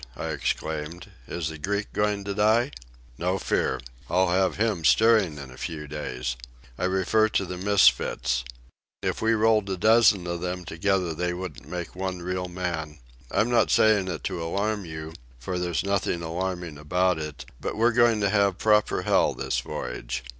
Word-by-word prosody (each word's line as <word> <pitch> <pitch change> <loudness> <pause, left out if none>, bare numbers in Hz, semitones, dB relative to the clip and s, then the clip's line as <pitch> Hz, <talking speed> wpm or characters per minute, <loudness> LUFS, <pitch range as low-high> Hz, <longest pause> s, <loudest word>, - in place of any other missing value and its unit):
I - - -3
exclaimed. 80 +2 -3 0.2
"Is 85 -2 -3
the 80 -1 -8
Greek 100 +6 -2
going 105 -1 0
to 100 0 -3
die?" 110 +6 +3 0.5
"No 90 +2 0
fear. - - 0 0.3
I'll 95 +1 +3
have 95 +1 +2
him 105 -6 0
steering 110 -6 +4
in 70 -2 -8
a 65 - -13
few 75 -2 -5
days. 65 -4 -4 0.4
I 90 - -2
refer 95 +4 +2
to 100 - 0
the 90 0 -6
misfits. 65 -9 +3 0.6
If - - -1
we 115 +1 +3
rolled 110 -2 +3
a 95 - -2
dozen 110 -2 +5
of 85 -1 -3
them 90 0 -4
together 90 +1 0
they 90 +2 -1
wouldn't 90 -4 -7
make 90 -1 -5
one 95 -1 -4
real 90 0 -2
man. 85 -4 -4 0.3
I'm 115 +3 +1
not 120 - +3
saying 105 -3 +4
it 85 -4 -4
to 90 -3 -3
alarm 100 +4 -1
you, 80 -1 -7 0.2
for 90 +9 -4
there's 90 -1 -1
nothing 100 -3 -1
alarming 90 -2 -4
about 90 +3 +1
it; 75 -4 -6
but - - -4
we're 115 +2 +4
going 120 -2 +4
to 100 - +2
have 100 -2 +2
proper 105 0 +2
hell - - +3
this - - -1
voyage." - - -5
90 Hz, 175 wpm, -26 LUFS, 80-105 Hz, 0.6 s, dozen